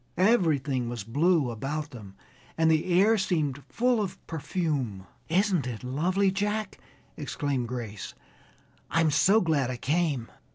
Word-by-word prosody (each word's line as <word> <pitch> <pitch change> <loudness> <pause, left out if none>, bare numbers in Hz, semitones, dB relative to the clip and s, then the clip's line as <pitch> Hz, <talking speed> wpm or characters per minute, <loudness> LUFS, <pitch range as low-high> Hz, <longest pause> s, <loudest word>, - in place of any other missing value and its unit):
Everything 155 - +2
was 120 -4 -5
blue 145 - +2
about 145 +7 -4
them, 100 -5 -11 0.4
and 160 0 +4
the 155 0 +2
air 205 +5 +5
seemed 155 -8 0
full 245 -1 +2
of 195 -3 -4
perfume. 145 - -2 0.2
"Isn't 185 -4 +2
it 120 -2 -6
lovely, 180 +10 +1
Jack!" 210 +1 -2 0.4
exclaimed 140 -3 -2
Grace. 115 -5 -6 0.7
"I'm 165 -1 +2
so 195 +9 +4
glad 150 -7 +1
I 125 - -3
came!" 145 -3 0
155 Hz, 130 wpm, -27 LUFS, 125-185 Hz, 0.7 s, air